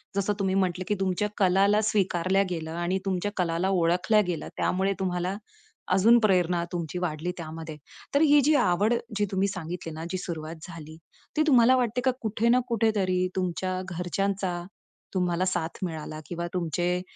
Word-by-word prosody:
जसं 200 +1 +1
तुम्ही 190 -1 +1
म्हटलं, 185 -1 0
की 210 - +1
तुमच्या 190 +2 0
कलाला 200 +2 +4
स्वीकारल्या 195 -2 +2
गेलं 160 -2 -4
आणि 175 +3 -1
तुमच्या 195 +1 -1
कलाला 175 +1 0
ओळखल्या 185 +4 +3
गेलं. 175 -3 -3
त्यामुळे 195 +2 +1
तुम्हाला 180 0 -1 0.6
अजून 225 +6 +6
प्रेरणा 180 -5 +2
तुमची 170 -2 -4
वाढली 175 0 -2
त्यामध्ये. 160 -1 -7 0.4
तर 290 - +5
ही 295 -1 +6
जी 300 +3 +3
आवड 210 -2 +3 0.2
जी 210 - +2
तुम्ही 195 +1 +1
सांगितली 175 -3 -5
ना, 160 +1 -6
जी 185 - -1
सुरुवात 160 -2 -5
झाली, 160 -2 -10 0.4
ती - - +4
तुम्हाला 255 -3 +6
वाटते 250 -1 0
का 260 - +5
कुठे 225 +1 0
ना 250 +1 +5
कुठेतरी 200 -6 +1
तुमच्या 185 0 -2
घरच्यांचा, 180 0 -2 0.5
तुम्हाला 180 -1 +1
साथ 170 -3 -2
मिळाला 155 -2 -6
किंवा 170 0 -4
तुमचे 175 +1 0
185 Hz, 155 wpm, -27 LUFS, 175-200 Hz, 0.6 s, अजून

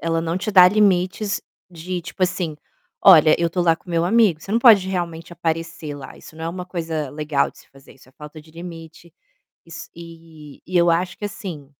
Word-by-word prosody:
ela 165 0 -1
não 165 +2 -2
te 205 - -3
dá 180 -2 +8
limites 200 0 +1 0.3
de, 180 +1 -6
tipo 175 +2 -7
assim: 180 -4 -1 0.5
"Olha, 160 -5 +7
eu 170 -1 +1
tô 180 - -2
lá 170 -2 +3
com 170 - -22
o - - -9
meu 165 0 +1
amigo, 200 -4 +3
você 195 - -7
não 230 - +3
pode 210 -6 +6
realmente 170 -3 -4
aparecer 165 -2 -4
lá". 135 -2 -11
Isso 155 - -15
não 160 - -7
é - - -2
uma 180 +1 -6
coisa 160 -5 -4
legal 150 -1 -1
de - - -22
se - - -20
fazer, 135 0 -18
isso 130 - -21
é - - -23
falta 150 +2 -12
de 155 +1 -20
limite. 165 -1 -11 0.5
Is 165 +1 -11
e 165 -3 -13
e 185 - -7
eu 175 -1 +4
acho 175 +2 0
que, 205 - -5
assim 180 -8 -7
170 Hz, 220 wpm, -21 LUFS, 160-180 Hz, 0.5 s, dá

